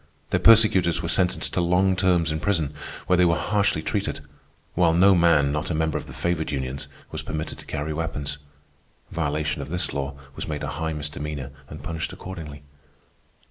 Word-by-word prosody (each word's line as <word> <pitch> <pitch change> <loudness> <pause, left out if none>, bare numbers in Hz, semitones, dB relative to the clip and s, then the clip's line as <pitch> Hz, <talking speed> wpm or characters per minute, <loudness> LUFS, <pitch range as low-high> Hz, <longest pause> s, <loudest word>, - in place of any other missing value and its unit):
Their - - +2
persecutors 105 -7 +5
were - - -1
sentenced 90 -1 +1
to 90 - +1
long 90 +2 +3
terms 90 -3 +2
in 80 - -1
prison, 80 -6 0 0.3
where 90 - +3
they 90 - +5
were 85 -1 +3
harshly 100 -6 +1
treated; - - -2 0.5
while 85 -2 +3
no 95 +3 +6
man, 85 -5 +4
not 75 +4 -2
a 85 - -1
member 80 -1 0
of - - -3
the - - -9
favored 85 -2 -1
unions, 65 -1 -3 0.2
was - - -3
permitted 80 0 -5
to - - -13
carry 75 +1 -3
weapons. 75 -3 -3 0.7
Violation 75 -2 -1
of 70 - -7
this 90 +2 -1
law 70 0 -3 0.2
was - - -5
made 75 -2 -3
a 75 - -2
high 80 +2 -3
misdemeanor 75 -2 -4 0.2
and 75 - -9
punished 80 -2 -3
accordingly. 80 -6 -8
80 Hz, 180 wpm, -25 LUFS, 75-90 Hz, 0.7 s, no